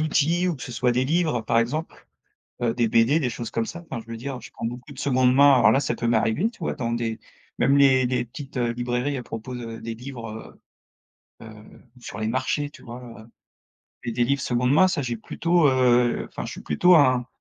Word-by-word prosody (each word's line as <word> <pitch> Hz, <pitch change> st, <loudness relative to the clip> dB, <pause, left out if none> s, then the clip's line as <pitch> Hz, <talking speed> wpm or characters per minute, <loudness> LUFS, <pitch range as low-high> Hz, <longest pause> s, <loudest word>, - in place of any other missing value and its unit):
outils 160 Hz, +3 st, +1 dB
ou 170 Hz, -, -2 dB
que 130 Hz, -, -11 dB
ce 125 Hz, -, -7 dB
soit 125 Hz, +1 st, +1 dB
des 125 Hz, +2 st, +1 dB
livres 155 Hz, -4 st, 0 dB
par 115 Hz, -, +1 dB
exemple, 140 Hz, +8 st, -3 dB, 0.5 s
heu, 120 Hz, -1 st, +2 dB
des 120 Hz, -2 st, +1 dB
BD, 115 Hz, +8 st, +3 dB
des 130 Hz, -, 0 dB
choses 120 Hz, -1 st, -6 dB
comme 115 Hz, 0 st, -2 dB
ça. 170 Hz, +6 st, -8 dB
Enfin 125 Hz, -, -4 dB
je 115 Hz, -, -15 dB
veux 115 Hz, -, -5 dB
dire, 130 Hz, +2 st, -6 dB
je 115 Hz, -, -12 dB
prends -, -, -8 dB
beaucoup 125 Hz, +4 st, -6 dB
de 135 Hz, -, -15 dB
seconde 130 Hz, -2 st, +2 dB
main, 140 Hz, -1 st, +6 dB
voilà, 130 Hz, +3 st, +5 dB
ça 120 Hz, -, -1 dB
peut 115 Hz, -, -3 dB
m'arriver, 115 Hz, -, +1 dB
tu -, -, -21 dB
vois, 165 Hz, -, -2 dB
dans 115 Hz, -5 st, -3 dB
des 115 Hz, -1 st, -3 dB, 0.4 s
même 140 Hz, -, +3 dB
les 130 Hz, -2 st, +5 dB
les 125 Hz, 0 st, -1 dB
petites 135 Hz, +3 st, -10 dB
heu, 120 Hz, -2 st, 0 dB
librairies 125 Hz, +3 st, -2 dB
à -, -, -6 dB
propos 115 Hz, +2 st, -7 dB
de 115 Hz, -2 st, -6 dB
des 115 Hz, 0 st, -6 dB
livres, 115 Hz, -3 st, -9 dB, 0.8 s
heu -, -, -10 dB
heu, 110 Hz, -, -10 dB, 0.5 s
sur 105 Hz, -, -8 dB
les 110 Hz, -, -1 dB
marchés, 130 Hz, +4 st, -1 dB
tu -, -, -16 dB
vois? 120 Hz, +1 st, -9 dB, 0.2 s
Heu, 110 Hz, -, -14 dB, 0.8 s
et 120 Hz, -, -2 dB
des 120 Hz, +1 st, +1 dB
livres 140 Hz, +2 st, 0 dB
seconde 125 Hz, 0 st, +1 dB
main, 185 Hz, +6 st, +5 dB
ça 170 Hz, -5 st, -1 dB
j'ai 120 Hz, -2 st, -3 dB
plutôt, 165 Hz, +7 st, +1 dB
heu 125 Hz, -2 st, +2 dB
enfin -, -, -7 dB
je -, -, -6 dB
suis -, -, -9 dB
plutôt 180 Hz, 0 st, +4 dB
un 130 Hz, -5 st, +3 dB
125 Hz, 230 wpm, -24 LUFS, 115-140 Hz, 0.8 s, main